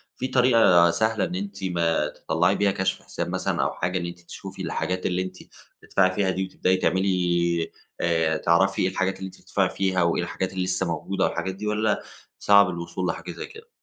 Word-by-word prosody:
في 130 - -3
طريقة 115 -10 +5
سهلة 110 +4 +1
إن 180 - -2
أنتِ 200 - -5
ما 85 -3 +1
تطلعي 85 +4 0
بيها 100 0 +2
كشف 95 0 -1
حساب - - -5
مثلًا - - -1
أو - - -1
حاجة 90 +2 -2
إن 85 - -3
أنتِ 85 0 -7
تشوفي 85 - -9
الحاجات 90 0 -2
اللي 90 0 0
أنتِ 90 0 -6 0.4
بتدفعي 95 -1 +2
فيها 95 -1 +1
دي، 95 +1 -1
وتبدئي 95 0 0
تعملي 90 -3 +1 0.3
آآ، 80 -2 +1
تعرفي 85 +5 +2
إيه - - +3
الحاجات 95 0 -1
اللي 95 - -6
أنتِ 95 - -14
بتدفعي - - 0
فيها، 95 -2 0
وإإيه 85 0 +1
الحاجات 95 0 -3
اللي 95 -1 -1
لسه 90 0 -1
موجودة، 95 +3 -1
والحاجات 95 0 -2
دي، 105 +2 -5
والَّا 105 0 0 0.4
صعب 100 -2 +6
الوصول 85 +1 -4
لحاجة - - -4
زي - - -6
كده؟ 450 +1 -14
95 Hz, 195 wpm, -25 LUFS, 85-100 Hz, 0.4 s, صعب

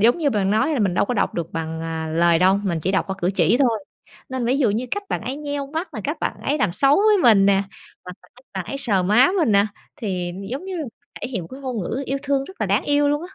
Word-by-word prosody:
giống 235 - +4
như, 295 -4 +1
bạn 200 -3 +1
nói 220 +9 +2
là - - -1
mình 190 -4 +1
đâu - - +2
có 245 - -2
đọc 200 - 0
được 170 -1 -4
bằng, 160 0 -4
à, 160 -1 -4
lời 170 0 +4
đâu, 190 +2 +4
mình 170 -4 0
chỉ 190 - 0
đọc 190 - +1
qua 190 - -3
cử 180 +1 +1
chỉ 185 +6 +3
thôi. 230 -7 +1 0.4
Nên 260 -1 -3
là - - -1
ví 260 +3 +2
dụ 240 -7 +3
như 235 +5 -2
cách 410 - -2
bạn - - -2
ấy 255 +5 -4
nheo 285 -1 -4
mắt 320 +6 -4
nè, - - -4
cách - - -2
bạn - - -2
ấy 290 +2 0
làm 175 - +1
xấu 275 +6 +4
với 420 0 +4
mình 205 -5 +6
nè 195 0 +4 0.4
và 180 - -7 0.2
cách 255 - -19
bạn 190 -2 -4
ấy 275 - -4
sờ 200 -8 +1
má 225 - +5
mình 255 -11 +2
nè, 200 +1 +4 0.3
thì, 185 -8 -3 0.2
giống 275 +8 -4
như 380 -1 -5
là, 315 - -3 0.4
thể 255 - -4
hiện 220 -9 -3
một 165 - -10
cái 265 +2 -9
ngôn 255 -4 -4
ngữ 250 +9 -3
yêu 275 +1 -1
thương 275 -1 0
rất 380 +1 -14
là 215 - +1
đáng 200 +7 +1
yêu 290 0 +3
luôn 295 +2 0
á. 385 - -19
230 Hz, 295 wpm, -22 LUFS, 190-280 Hz, 0.4 s, mình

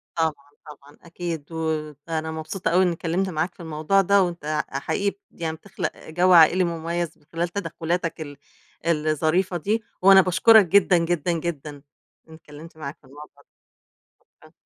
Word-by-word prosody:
طبعًا، 150 -3 -2
طبعًا، 145 -1 -15
أكيد 170 -2 -6
و - - -8 0.5
وأنا 160 -1 -3
مبسوطة 160 +3 -4
أوي 185 +2 +4
إنّي 175 -2 +1
اتكلّمت 175 +4 -2
معاك 170 +2 -2
في - - -34
الموضوع 160 +4 +1
ده 200 +1 +4
وأنت 170 -4 -5 0.2
ع 135 - -4
حقيقي 200 +7 -1 0.2
ب - - -20
يعني 160 -1 -2
بتخلَق - - -5
آآ - - -14
جَو 180 +3 +3
عائلي 170 +2 +6
مُميَّز 170 0 -3
من 150 - -29
خلال 170 +1 -1
تدخّلاتك 170 -2 -3
ال 145 -2 -8 0.5
الظريفة 160 +3 +1
دي، 215 +7 -1 0.2
وأنا 195 0 +8
باشكُرك 190 +4 +5
جدًا، 185 0 +4
جدًا، 170 0 0
جدًا 160 -3 -4 0.6
إنّي 160 - -13
اتكلّمت 160 +1 -14
معاك 145 -2 -7
في - - -58
الموضوع 145 +1 -14
ده. - - -71 0.8
شكرًا. - - -20
165 Hz, 170 wpm, -23 LUFS, 155-180 Hz, 0.8 s, وأنا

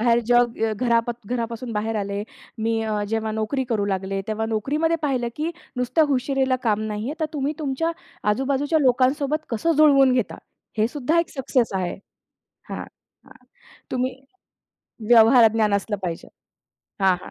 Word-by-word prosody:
बाहेर 235 +1 +4
जग 240 -1 +3 0.2
घरा 235 +1 +2 0.3
घरापासून 235 0 -3
बाहेर 215 +1 -2
आले. 200 0 -2 0.4
मी 225 0 +1
अ, 210 -1 -1
जेव्हा 220 0 -1
नोकरी 220 +5 -1
करू 210 -3 +1
लागले, 195 0 -2
तेव्हा 220 +1 -1
नोकरीमध्ये 295 +10 0
पाहिलं 255 -5 0
की 310 +2 -1 0.3
नुसत्या 250 +6 +2
हुशारीला 265 -1 +1
काम 215 -2 +2
नाहीये. 215 +6 -3
तर 315 - +1
तुम्ही 290 0 -1
तुमच्या 305 +3 -1 0.4
आजूबाजूच्या 280 +6 +1
लोकांसोबत 275 +4 +2
कसं 245 +9 +1
जुळवून 275 -4 +6
घेता 245 -4 -1 0.4
हेसुद्धा 275 +8 +1
एक 335 - -5
सक्सेस 250 -3 +1
आहे 180 -2 -2 0.8
हां. - - -4 0.4
हां. - - -19 0.5
तुम्ही 255 0 -1 0.9
व्यवहारज्ञान 225 -2 +6
असलं 205 +1 -1
पाहिजे 170 -2 -4 0.7
हां, 190 -1 +4
हां. - - -10
240 Hz, 140 wpm, -23 LUFS, 220-275 Hz, 0.9 s, जुळवून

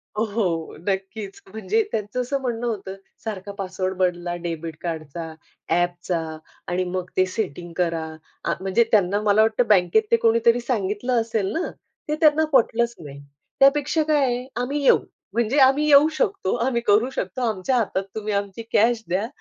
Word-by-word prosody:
अ, 210 - -1
हो, 175 -7 -1
नक्कीच 195 +1 -3
म्हणजे 310 - 0
त्यांचं 215 +3 -2
असं 275 +3 -2
म्हणणं 240 -2 -2
होतं, 195 -4 -4 0.3
"सारखा 205 -2 -5
पासवर्ड 185 -1 -3
बदला 175 -1 0
डेबिट 165 -1 -4
कार्डचा, 165 -1 -5 0.4
ॲपचा 175 0 0 0.5
आणि 180 +1 0
मग 185 0 -4
ते 185 - +5
सेटिंग 180 -3 -4
करा," 165 -2 0 0.4
आ - - +1
म्हणजे 195 +4 +3
त्यांना 205 -2 +3
मला 210 0 +4
वाटतं 225 +2 +2
बँकेत 195 +1 +4
ते - - +7
कोणीतरी 230 +1 +4
सांगितलं 230 +1 0
असेल 220 -3 -1
ना, 330 - -1 0.5
ते 300 - +1
त्यांना 315 0 +5
पटलंच 235 -2 +3
नाही. 140 -3 -10 0.4
त्यापेक्षा 290 +3 +4
काय 300 -2 +2
आहे 245 0 -1 0.2
आम्ही 280 +4 -2
येऊ. - - +6 0.4
म्हणजे 235 +5 +1
आम्ही 290 +3 +1
येऊ 290 +1 +7
शकतो, 195 -6 0
आम्ही 245 -2 0
करू 220 +5 +4
शकतो, 195 -1 -4
आमच्या 215 +6 -1
हातात 200 -4 0
तुम्ही 215 -1 -3
आमची 200 +2 -3
कॅश 225 +1 +3
द्या, 195 +5 0
210 Hz, 160 wpm, -23 LUFS, 185-240 Hz, 0.5 s, ते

